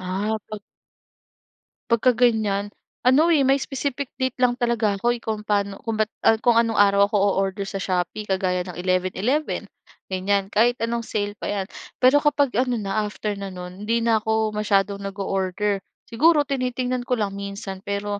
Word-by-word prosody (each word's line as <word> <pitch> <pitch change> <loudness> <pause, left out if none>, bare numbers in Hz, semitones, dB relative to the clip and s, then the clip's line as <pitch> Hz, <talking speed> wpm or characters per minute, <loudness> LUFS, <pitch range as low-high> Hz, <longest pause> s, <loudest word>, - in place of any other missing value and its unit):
Ah, 195 +4 -2
'pag 215 -1 -6 1.3
'Pag 235 -2 +2
ka 255 - +6
ganiyan, 215 -4 +1 0.4
ano 305 +7 +5
eh, 280 -5 +4
may 270 - +5
specific 275 0 -3
date 260 -1 -1
lang 245 0 +2
talaga 225 -5 +1
ako 240 +2 +1
eh, 235 - -11
kung 215 -1 -4
paano 200 -1 0
kung 225 -1 -3
ba't 215 0 0 0.2
ah, 225 - +7
kung 235 -1 +5
anong 230 -1 +1
araw 200 0 +5
ako 210 - -3 0.2
oorder 195 +1 -1
sa 195 0 -5
Shopee 185 +3 -2
kagaya 185 -1 0
ng 180 - -7
11/11, 185 +10 0 0.5
ganiyan. 195 +1 0
Kahit 240 +3 +3
anong 230 0 -2
sale 205 -1 -2
pa - - -4
'yan. 200 -2 -2 0.4
Pero 260 +3 +7
kapag 290 -2 +2
ano 250 -1 +1
na, 210 -1 -1
after 210 -1 -4
na 200 - -5
nun, 185 +2 -8
hindi 230 0 +1
na 230 -1 +3
ako 220 0 0
masyadong 200 -1 +1
nag-oorder. 195 0 -2 0.3
Siguro 300 +5 +4
tinitingnan 255 -2 -2
ko 250 - +2
lang 210 -4 -1
minsan, 200 -1 -6
pero 200 +1 -3
210 Hz, 175 wpm, -23 LUFS, 195-240 Hz, 1.3 s, ah